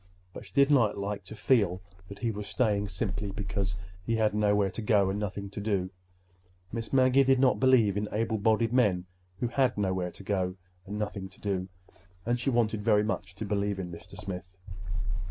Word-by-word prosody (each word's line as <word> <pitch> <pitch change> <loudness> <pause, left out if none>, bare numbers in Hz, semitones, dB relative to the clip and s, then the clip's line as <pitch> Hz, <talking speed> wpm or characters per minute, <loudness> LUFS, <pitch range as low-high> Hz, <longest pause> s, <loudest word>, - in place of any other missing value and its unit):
But - - -9
she - - -18
did 140 +1 +5
not 120 -8 +4
like 100 +1 -3
to 110 - -9
feel 100 -7 +2 0.3
that 100 +1 -9
he 115 +2 -1
was 105 -1 -6
staying 105 -5 +1
simply 100 +2 -2
because 95 -1 -2 0.3
he 115 +4 0
had 110 -2 +2
nowhere 105 -2 +2
to - - -5
go 100 -3 +3
and 100 - -2
nothing 100 -1 -3
to 105 - -5
do. 100 -3 0 0.8
Miss 115 0 -4
Maggie 130 0 +5
did 135 -1 +4
not 130 -1 +4
believe 125 -6 +4
in 105 0 -1
able 110 0 0
bodied 110 +2 +2
men 100 -8 +3 0.4
who 120 - +2
had 130 -1 +2
nowhere 95 -3 0
to 100 - -12
go 95 -3 -1 0.3
and 105 +2 -4
nothing 105 -2 -4
to 95 - -17
do—and 95 +2 -4
she 125 - 0
wanted 115 -4 +1
very 105 -1 +4
much 95 -3 -3
to 110 - -5
believe 100 0 0
in 90 -2 -5
Mr. 85 +3 -11
Smith. 95 -2 -7
105 Hz, 190 wpm, -29 LUFS, 95-115 Hz, 0.8 s, did